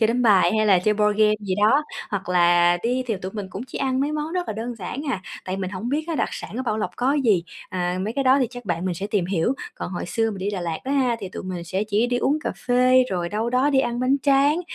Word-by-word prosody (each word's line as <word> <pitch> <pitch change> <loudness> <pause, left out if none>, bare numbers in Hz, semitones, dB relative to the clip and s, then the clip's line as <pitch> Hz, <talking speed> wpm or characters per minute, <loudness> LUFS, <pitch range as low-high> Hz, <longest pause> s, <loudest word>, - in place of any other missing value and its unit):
chơi 220 - +5
đánh 245 +2 0
bài, 205 -6 +5
hay 215 - +2
là 195 -3 +5
chơi 210 +4 +1
board 210 0 +1
game 215 0 +5
gì 190 -3 -2
đó, 220 +9 +3 0.3
hoặc 200 -2 -3
là 175 0 +4
đi 250 +2 0
thì 225 - -1
tụi 185 +1 -7
mình 205 -3 -5
cũng 195 - -6
chỉ - - -7
ăn 265 -1 0
mấy 290 +2 0
món 305 +2 -3
rất 360 -1 -1
là - - -1
đơn 230 +3 -5
giản 200 +9 -5
à, 190 -6 -3 0.2
tại 185 0 -3
mình 185 -1 -3
hổng 205 +5 -5
biết 300 +3 -1
á 330 - -1
đặc - - 0
sản - - -7
ở 260 - -2
Bảo 220 -4 -1
Lộc 215 - -2
có 255 +3 +1
gì. 225 - +2 0.3
À, 180 0 -2
mấy 210 +3 -2
cái 275 +3 -1
đó 265 +2 +5
thì 255 - +2
chắc 245 -1 -9
bạn 175 -2 -2
mình 185 -2 -1
sẽ 195 +4 -4
tìm 205 -4 0
hiểu, 190 +7 0 0.2
còn - - -6
hồi 175 - -4
xưa 225 +4 0
mình 200 - -6
đi 200 +2 -2
Đà 190 - -3
Lạt 165 -2 -3
đó 270 - -2
ha, 255 -4 +2
thì 190 - -5
tụi - - -7
mình 180 -2 -5
sẽ 190 +4 -2
chỉ 215 +2 +1
đi 245 0 0
uống 285 +5 +1
cà - - -1
phê, 255 +1 +5
rồi 175 -2 -1
đâu 220 +4 -2
đó 260 +4 +2
đi 270 - +3
ăn 240 -2 -2
bánh 260 +2 +3
tráng, 285 +4 +3
215 Hz, 300 wpm, -23 LUFS, 185-255 Hz, 0.3 s, chơi